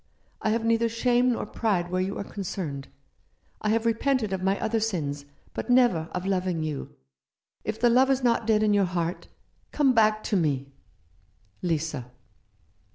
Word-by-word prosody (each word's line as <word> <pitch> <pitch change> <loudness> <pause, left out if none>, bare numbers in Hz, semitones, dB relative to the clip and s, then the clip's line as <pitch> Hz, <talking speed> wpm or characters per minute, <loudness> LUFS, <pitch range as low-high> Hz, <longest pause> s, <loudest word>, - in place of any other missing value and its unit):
I - - 0
have 225 +1 0
neither 230 0 +2
shame 245 +2 +2
nor - - -3
pride 180 -6 -1
where 185 0 +1
you 195 +2 -2
are - - -3
concerned. 175 -9 -5 0.7
I 210 - 0
have 225 +1 +1
repented 230 -2 +1
of 190 - -2
my 195 +1 +1
other 225 0 0
sins, 150 -10 -2 0.3
but - - -5
never 240 -11 +4
of 180 +1 -3
loving 185 -4 0
you. 145 - -5 0.7
If 215 +2 -4
the 240 -1 +4
love 260 +3 +5
is 270 -1 +1
not 235 -2 +2
dead 215 -1 +3
in 210 -1 +3
your 200 -1 +4
heart, 175 -1 -3 0.4
come 280 -3 +3
back 215 -2 +3
to - - -1
me. 140 -6 0 0.5
" 100 +2 -38
Lisa." 155 -7 -2
200 Hz, 170 wpm, -26 LUFS, 170-230 Hz, 0.7 s, love